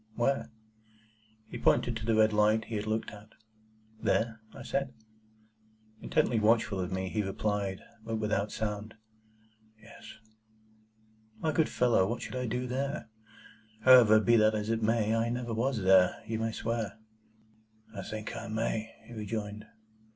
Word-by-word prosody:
"Where?" 135 Hz, +3 st, 0 dB, 1.0 s
He -, -, -7 dB
pointed 120 Hz, -1 st, +2 dB
to 110 Hz, 0 st, -5 dB
the 115 Hz, -, +3 dB
red 110 Hz, 0 st, +4 dB
light 105 Hz, +1 st, +3 dB
he 115 Hz, -, -6 dB
had 105 Hz, 0 st, -3 dB
looked 110 Hz, +1 st, -2 dB
at. 105 Hz, +1 st, -14 dB, 0.7 s
"There?" 110 Hz, -1 st, 0 dB
I -, -, -10 dB
said. 135 Hz, -2 st, -2 dB, 1.1 s
Intently 115 Hz, -, +1 dB
watchful 110 Hz, -2 st, +2 dB
of 90 Hz, 0 st, -3 dB
me, 95 Hz, 0 st, -2 dB
he 105 Hz, +3 st, -1 dB
replied 100 Hz, -1 st, -2 dB, 0.2 s
(but 115 Hz, 0 st, -3 dB
without 105 Hz, -1 st, -1 dB
sound), 105 Hz, 0 st, -4 dB, 0.8 s
"Yes." 110 Hz, 0 st, -13 dB, 1.2 s
"My 160 Hz, -, 0 dB
good 155 Hz, +1 st, +1 dB
fellow, 120 Hz, -6 st, +2 dB
what 120 Hz, +3 st, -3 dB
should -, -, -7 dB
I 125 Hz, -1 st, -2 dB
do 125 Hz, +3 st, -2 dB
there? 135 Hz, 0 st, -3 dB, 0.7 s
However, 115 Hz, -3 st, +8 dB
be 120 Hz, +2 st, +4 dB
that 110 Hz, 0 st, +4 dB
as 105 Hz, +1 st, -2 dB
it 115 Hz, 0 st, -1 dB
may, 110 Hz, 0 st, +1 dB
I 115 Hz, +1 st, +1 dB
never 120 Hz, -1 st, -3 dB
was 115 Hz, -1 st, -1 dB
there, 95 Hz, -1 st, +4 dB
you 110 Hz, 0 st, -3 dB
may 115 Hz, 0 st, -1 dB
swear." 115 Hz, -2 st, -3 dB, 1.0 s
"I 100 Hz, -, -4 dB
think 110 Hz, +2 st, -6 dB
I -, -, -6 dB
may," 110 Hz, 0 st, -2 dB
he 120 Hz, -, -12 dB
rejoined. 105 Hz, -1 st, -5 dB
110 Hz, 150 wpm, -30 LUFS, 105-115 Hz, 1.2 s, However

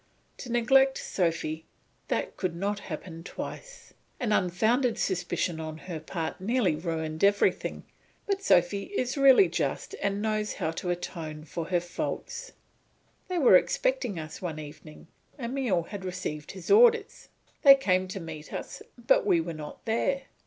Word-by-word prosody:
To 250 Hz, -, -7 dB
neglect 265 Hz, +3 st, +4 dB
Sophy, 160 Hz, -3 st, -2 dB, 0.4 s
that -, -, -2 dB
could 180 Hz, -3 st, -2 dB
not 200 Hz, +3 st, -2 dB
happen 165 Hz, -2 st, -7 dB
twice. -, -, -8 dB, 0.3 s
An 235 Hz, -4 st, -1 dB
unfounded 220 Hz, +7 st, +2 dB
suspicion 180 Hz, -2 st, -1 dB
on 155 Hz, -1 st, -5 dB
her 165 Hz, -1 st, -6 dB
part 160 Hz, +2 st, -5 dB
nearly 210 Hz, -5 st, +1 dB
ruined 160 Hz, 0 st, -3 dB
everything, 200 Hz, 0 st, +2 dB, 0.4 s
but 395 Hz, -1 st, -1 dB
Sophy 190 Hz, -, +3 dB
is 250 Hz, 0 st, -1 dB
really 275 Hz, +7 st, +7 dB
just -, -, -2 dB
and 200 Hz, 0 st, 0 dB
knows 215 Hz, 0 st, -1 dB
how 160 Hz, -, -2 dB
to 180 Hz, +2 st, -4 dB
atone 165 Hz, -3 st, -4 dB
for 160 Hz, +2 st, -5 dB
her 180 Hz, +1 st, +1 dB
faults. 475 Hz, -, -5 dB, 0.7 s
They 365 Hz, -, -2 dB
were 285 Hz, -7 st, +7 dB
expecting -, -, +1 dB
us 155 Hz, -1 st, -7 dB
one 170 Hz, -4 st, -4 dB
evening; 150 Hz, 0 st, -10 dB, 0.3 s
Emile 240 Hz, -8 st, 0 dB
had 195 Hz, +3 st, -8 dB
received 180 Hz, -5 st, -5 dB
his 185 Hz, -3 st, -6 dB
orders. 460 Hz, 0 st, +4 dB, 0.3 s
They 275 Hz, -1 st, +10 dB
came 185 Hz, -8 st, +1 dB
to 195 Hz, +1 st, -5 dB
meet 160 Hz, -3 st, -8 dB
us, -, -, -6 dB, 0.2 s
but 240 Hz, +3 st, +3 dB
we 185 Hz, -4 st, +3 dB
were 165 Hz, +1 st, -3 dB
not 150 Hz, -1 st, -9 dB
there. 265 Hz, +4 st, 0 dB
185 Hz, 150 wpm, -28 LUFS, 165-245 Hz, 0.7 s, They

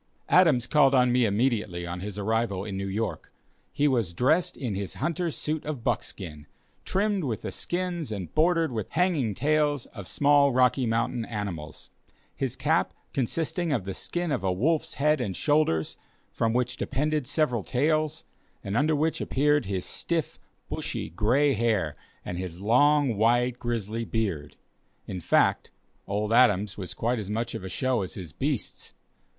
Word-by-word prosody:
Adams 155 Hz, -10 st, +5 dB
called 140 Hz, 0 st, +4 dB
on 125 Hz, -1 st, +4 dB
me 125 Hz, -1 st, +3 dB
immediately 105 Hz, -5 st, 0 dB
on 85 Hz, +1 st, -5 dB
his 100 Hz, +1 st, -6 dB
arrival 105 Hz, -2 st, -1 dB
in 100 Hz, -2 st, -5 dB
New 100 Hz, 0 st, -3 dB
York. 105 Hz, +3 st, -3 dB, 0.4 s
He 145 Hz, 0 st, +2 dB
was 115 Hz, -, 0 dB
dressed 155 Hz, -, +2 dB
in 120 Hz, -6 st, -3 dB
his 95 Hz, 0 st, -4 dB
hunter's 170 Hz, -1 st, -2 dB
suit 155 Hz, 0 st, -2 dB
of 150 Hz, -6 st, -5 dB
buckskin, 85 Hz, -, -3 dB, 0.4 s
trimmed 200 Hz, -1 st, 0 dB
with 120 Hz, -6 st, -3 dB
the -, -, -4 dB
skins 175 Hz, -6 st, -3 dB
and 95 Hz, -6 st, -5 dB
bordered 165 Hz, -1 st, +3 dB
with 110 Hz, -4 st, -3 dB
the -, -, -26 dB
hanging 155 Hz, -, +1 dB
tails 145 Hz, 0 st, +1 dB
of 100 Hz, -4 st, -10 dB
small 145 Hz, -1 st, +4 dB
Rocky 125 Hz, 0 st, +3 dB
Mountain 115 Hz, +1 st, 0 dB
animals; 90 Hz, -9 st, -6 dB, 0.4 s
his -, -, -2 dB
cap -, -, +1 dB, 0.2 s
consisting 160 Hz, +6 st, -1 dB
of 115 Hz, -10 st, 0 dB
the 95 Hz, -, -3 dB
skin 175 Hz, -, -3 dB
of 130 Hz, -8 st, -1 dB
a 95 Hz, -, +1 dB
wolf's 150 Hz, -, 0 dB
head 150 Hz, 0 st, +2 dB
and 100 Hz, -6 st, -2 dB
shoulders, 145 Hz, -, +1 dB, 0.3 s
from 115 Hz, -, 0 dB
which 125 Hz, +1 st, 0 dB
depended 150 Hz, 0 st, -1 dB
several 140 Hz, -6 st, +1 dB
tails, 155 Hz, -, 0 dB, 0.4 s
and 100 Hz, -, -3 dB
under 150 Hz, +5 st, +3 dB
which 155 Hz, +2 st, 0 dB
appeared 145 Hz, -3 st, +2 dB
his 95 Hz, -2 st, -2 dB
stiff, 165 Hz, -3 st, -2 dB, 0.3 s
bushy, -, -, -4 dB
gray 125 Hz, -, +3 dB
hair 105 Hz, -, +1 dB, 0.3 s
and 90 Hz, -, -4 dB
his 90 Hz, -2 st, -5 dB
long, 125 Hz, +3 st, +3 dB
white, 120 Hz, +3 st, +2 dB
grizzly 115 Hz, -1 st, -2 dB
beard; 95 Hz, -12 st, -2 dB, 0.5 s
in 90 Hz, -, -5 dB
fact -, -, +2 dB, 0.4 s
Old 105 Hz, +2 st, -1 dB
Adams 105 Hz, -5 st, +4 dB
was 95 Hz, -3 st, -6 dB
quite 120 Hz, +1 st, 0 dB
as 100 Hz, -2 st, -6 dB
much 115 Hz, +3 st, -2 dB
of -, -, -5 dB
a 95 Hz, -, -5 dB
show 130 Hz, +4 st, 0 dB
as 95 Hz, -, -5 dB
his 85 Hz, -7 st, -8 dB
beasts. -, -, -3 dB
120 Hz, 165 wpm, -27 LUFS, 100-145 Hz, 0.5 s, Adams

